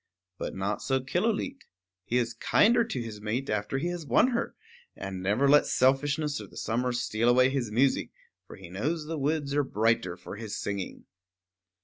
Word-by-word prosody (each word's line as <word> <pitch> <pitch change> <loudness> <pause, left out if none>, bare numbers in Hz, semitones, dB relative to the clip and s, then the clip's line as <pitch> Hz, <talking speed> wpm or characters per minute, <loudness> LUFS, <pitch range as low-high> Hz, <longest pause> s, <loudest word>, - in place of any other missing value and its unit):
But - - -4
not 95 +2 -2
so 135 -1 +1
Killooleet. 210 - -1 0.5
He 120 - 0
is 120 -1 0
kinder 235 - +4
to 225 - -4
his 105 -2 -8
mate 115 +5 -2
after 105 +5 -1
he 170 +6 -1
has 175 -2 -4
won 195 - +4
her, 235 -2 -2 0.4
and 95 -1 -6
never 105 +9 +2
lets 145 +1 +5
selfishness 145 +3 +2
or - - -9
the - - -15
summer 125 +3 -1
steal 120 -1 0
away 125 +1 +5
his 130 -5 -1
music; 130 +5 +2 0.4
for - - -10
he 95 - -11
knows 150 - -2
that 150 - -11
the 165 -2 -2
woods 145 0 0
are 145 0 +3
brighter 110 -7 +1
for 90 +3 -9
his 110 -2 -5
singing. 100 -2 -4
130 Hz, 190 wpm, -28 LUFS, 110-150 Hz, 0.5 s, lets